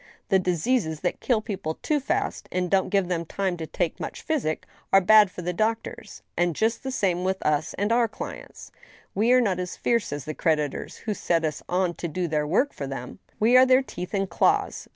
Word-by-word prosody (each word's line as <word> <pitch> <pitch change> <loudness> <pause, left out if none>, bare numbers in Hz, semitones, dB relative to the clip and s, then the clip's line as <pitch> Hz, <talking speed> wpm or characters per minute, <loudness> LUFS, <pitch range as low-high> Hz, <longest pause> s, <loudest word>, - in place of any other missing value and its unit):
The 190 - +4
diseases 180 -1 0
that 180 - -1
kill 235 -4 +1
people 195 -8 -4
too 300 -1 +1
fast, 275 - -2
and 180 -1 -1
don't 195 -1 +2
give 195 -3 +1
them 170 -2 -1
time 190 +2 -2
to 160 -1 -5
take 175 0 -2
much - - -6
physic, 260 - -1 0.3
are 195 - +7
bad 210 +1 +6
for 180 -1 -8
the 180 +1 -2
doctors 220 +4 -3
— - - -48
^and 175 -1 +2
just 220 +8 0
the 265 - -4
same 185 -8 0
with 190 0 0
us 150 0 0
and 205 +2 -1
our 235 0 +4
clients. 215 - -9 0.4
We 220 +5 +2
are 255 0 +6
not 195 -6 0
as 180 -1 -4
fierce 235 -2 0
as 145 -1 -5
the 155 - -4
creditors 150 -2 -1
who 215 - 0
set 170 -4 0
us 155 -2 -3
on 180 -1 +1
to 170 - -3
do 175 +2 -2
their 150 -2 0
work 250 - +2
for 140 - -5
them. 130 -2 -7 0.2
We 230 +4 +4
are 255 +1 +8
their 260 +1 +5
teeth 180 -5 -6
and 195 0 0
claws. 405 - +1
185 Hz, 220 wpm, -25 LUFS, 165-220 Hz, 0.4 s, are